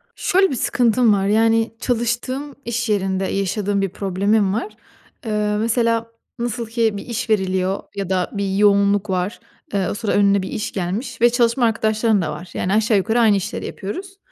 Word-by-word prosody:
Şöyle 380 +1 +2
bir - - -1
sıkıntım 235 -1 +3
var. 195 -1 +1
Yani, 225 +1 +2
çalıştığım 250 +4 -2
iş 235 0 -2
yerinde 195 -2 0
yaşadığım 200 +1 -1
bir 195 - 0
problemim 200 +2 0
var. 235 - -3 0.5
Eee, 210 -1 0
mesela, 230 0 +1 0.3
nasıl 235 0 -2
ki 225 -2 0
bir - - -7
iş 235 0 -4
veriliyor 190 -2 0
ya 195 -2 -4
da 185 -1 0
bir 200 -1 -2
yoğunluk 200 0 +3
var. 185 +2 -2 0.3
Eee, 195 -3 +1
o - - -2
sıra 220 0 -2
önüne 200 -1 +3
bir 190 - -5
iş 215 - -4
gelmiş 215 +7 -4
ve 240 - +7
çalışma 240 0 +2
arkadaşların 220 -1 +1
da 155 -3 -2
var. 170 +4 -8
Yani, 190 - -1
aşağı 220 0 +3
yukarı 220 +5 +1
aynı 220 -3 +5
işleri 190 - -4
yapıyoruz. 375 - -6
215 Hz, 175 wpm, -20 LUFS, 195-235 Hz, 0.5 s, ve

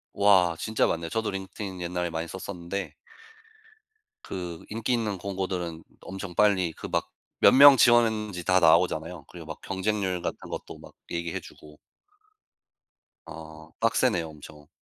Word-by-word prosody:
와 95 -4 +4
진짜 110 0 +1
많네요. 85 0 -2
저도 110 +2 -2
링크드인 95 -1 -6
옛날에 90 0 -2
많이 80 +1 -3
썼었는데 90 -2 -6 1.3
그 90 -3 -6
인기 115 +3 -1
있는 110 -4 -1
공고들은 90 -4 -4 0.2
엄청 95 -1 -7
빨리 95 -3 +3
그 - - -8
막 - - -1 0.3
몇 - - +8
명 140 +1 +10
지원했는지 110 -7 +3
다 90 0 +4
나오잖아요. 80 -1 +2
그리고 85 -2 -11
막 80 - -7
경쟁률 95 -2 -2
같은 - - -3
것도 - - -7
막 - - -14 0.2
얘기해 85 -1 -3
주고. 75 -1 -15 1.5
어. 80 -1 -11
빡세네요 115 -6 +1
엄청. 75 -1 -13
90 Hz, 295 characters per minute, -27 LUFS, 85-100 Hz, 1.5 s, 명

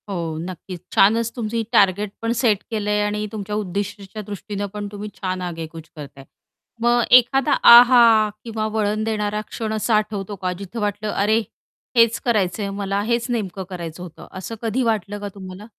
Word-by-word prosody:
हो, 165 -5 -3
नक्कीच. 180 +1 -7 0.2
छानच 225 +3 +4
तुमची 230 -1 -2
टार्गेट 200 +1 +3
पण 230 0 -1
सेट 210 -5 +2
केलंय 210 -1 0
आणि 210 0 -2
तुमच्या 210 -1 -5
उद्दिष्टाच्या 200 +1 -4
दृष्टीनं 205 0 -5
पण 205 -1 -5
तुम्ही 210 0 -6
छान 185 -1 -2
आगेकूच 165 -2 -7
करताय. 140 -2 -10 0.6
मग 240 +1 +3
एखादा 270 +3 +5 0.2
आहा! 235 -3 +8
किंवा 220 -2 -3
वळण 215 0 0
देणारा 210 -1 -1
क्षण 220 -1 -4
असा 220 +1 +1
आठवतो 210 -1 -2
का 185 -1 -3
जिथं 200 +4 -7
वाटलं, 210 0 -2
अरे, 215 +3 +2 0.6
हेच 230 -1 +4
करायचंय 205 -3 0
मला, 200 0 -2
हेच 235 +1 0
नेमकं 200 -5 -3
करायचं 175 -2 -7
होतं. 170 -3 -11
असं 190 +4 -7
कधी 235 +3 0
वाटलं 205 -3 -1
का 205 - -5
तुम्हाला? 190 +1 -9
210 Hz, 160 wpm, -21 LUFS, 190-225 Hz, 0.6 s, आहा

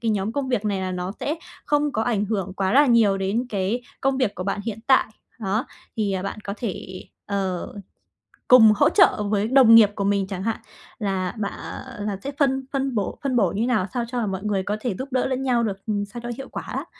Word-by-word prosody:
cái 225 -1 0
nhóm 205 +1 -1
công 270 0 -2
việc 230 -4 0
này 200 -2 0
là 185 0 -3
nó 180 +1 -3
sẽ 300 - -1 0.3
không 295 0 +1
có 220 - 0
ảnh 215 -4 0
hưởng 195 -3 -2
quá 190 0 0
là 285 +2 +6
nhiều 220 -5 +4
đến 210 +6 -1
cái 205 +4 -1 0.2
công 270 0 +1
việc 215 -6 +1
của 185 - -5
bạn 200 +1 -2
hiện 225 -2 -4
tại. 265 - +5 0.3
Đó, 215 +6 -1 0.3
thì, 205 -3 0
à, 190 -1 -2
bạn 200 +2 -5
có 200 - -4
thể, 185 -4 -6 0.2
ờ, 190 -3 -3 0.8
cùng 225 -4 +9
hỗ - - +4
trợ 210 - +4
với 210 0 +1
đồng 250 -3 +7
nghiệp 215 -3 +7
của 200 - -2
mình 200 -1 +1
chẳng 190 -1 -5
hạn, 225 0 -1 0.4
là 190 -3 -1
bạ, 200 -2 -1
ờ 245 -6 -8
là 200 -2 -2
sẽ 280 - -3
phân 265 -2 +2
phân 270 -2 -1
bổ 205 -3 -2
phân 265 -2 0
bổ 195 -7 +3
như 205 - -2
thế 240 - 0
nào, 215 -6 +1
sao 240 -2 -1
cho 240 -4 -2
mọi 195 +1 -4
người 200 -2 0
có 210 +2 -2
thể 240 -7 -2
giúp 260 - -4
đỡ 255 - +1
lẫn 260 0 -2
nhau 245 -3 +2
được, 195 -3 -4
ừm, 205 -1 -1
sao 235 +4 -9
cho 240 - -5
hiệu 270 - -8
quả - - -6
á. - - -5
215 Hz, 245 wpm, -23 LUFS, 195-245 Hz, 0.8 s, cùng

